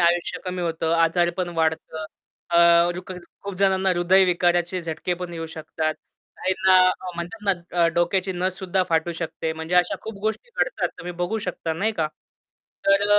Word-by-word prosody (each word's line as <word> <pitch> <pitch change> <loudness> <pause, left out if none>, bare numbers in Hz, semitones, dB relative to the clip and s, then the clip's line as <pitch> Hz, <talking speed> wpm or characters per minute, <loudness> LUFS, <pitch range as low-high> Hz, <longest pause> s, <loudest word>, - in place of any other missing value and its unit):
आयुष्य 170 0 +2
कमी 180 -1 -3
होतं. 165 -1 -1
आजारपण 175 +2 +2
वाढतं. 160 0 -1 0.5
अ, 170 - +4 0.4
रुकर 180 +1 -7 0.2
खूप 200 -1 -5
जणांना 190 -1 +3
हृदयविकाराचे 175 0 +3
झटके 165 +2 -3
पण 175 0 -6
येऊ 165 -1 -4
शकतात. 160 -1 -3 0.4
काहींना 185 0 +4 0.3
म्हणतात 175 +6 -5
ना, 200 - +4 0.3
अ, - - +6
डोक्याची 185 +2 +1
नस 185 +1 -1
सुद्धा 190 0 0
फाटू 165 0 +1
शकते. 160 -1 -3
म्हणजे 160 +2 -4
अशा 180 0 +4
खूप 220 - -6
गोष्टी 220 - -3
घडतात, - - 0
तुम्ही 180 - -6
बघू 175 +6 -2
शकता, 180 -5 -3
नाही 200 +8 0
का? 160 -7 0 0.8
तर 195 0 +5
अ, 205 - +7
175 Hz, 160 wpm, -24 LUFS, 165-190 Hz, 0.8 s, अ